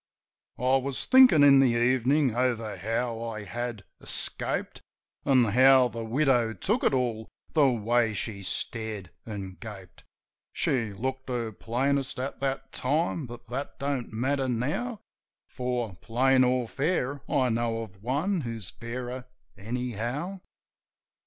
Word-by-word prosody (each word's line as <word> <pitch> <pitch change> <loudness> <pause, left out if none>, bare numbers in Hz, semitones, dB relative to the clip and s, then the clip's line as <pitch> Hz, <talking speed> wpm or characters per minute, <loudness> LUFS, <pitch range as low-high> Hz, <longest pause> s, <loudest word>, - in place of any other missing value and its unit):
I 130 +2 +3
was 135 0 -3
thinkin' 255 - +7
in 140 -1 +8
the 130 -3 +4
evenin' 130 +2 +3
over 120 -3 0
how 115 +4 -2
I 110 -2 -5
had 120 +1 -5 0.2
escaped. - - -2 0.4
An' 130 -3 +5
how 130 +3 +6
the 115 0 -5
widow 120 -2 +2
took 215 +6 0
it - - +4
all 120 -4 -1
— - - -35
the 150 -4 +5
way 115 -1 +1
she 100 +1 -4
stared 105 0 -4 0.2
an' 100 -4 -6
gaped. 100 -5 -10 0.5
She 115 -5 0
looked 130 +6 -4
her 120 -3 -2
plainest 135 +5 -1
at 130 +2 -4
that 135 -1 -2
time; 155 +1 0
but 120 0 -10
that 135 +4 -5
don't 140 -3 -2
matter 130 +4 0
now; 155 - -2 0.5
For, 125 -5 -3
plain 130 +5 +3
or 125 -1 +1
fair, 140 0 -1
I 130 -2 +2
know 115 0 -1
of 95 -3 -13
one 155 - 0
who's 115 - -5
fairer, 125 +3 -6 0.3
anyhow. 125 - -4
125 Hz, 135 wpm, -28 LUFS, 115-135 Hz, 0.5 s, in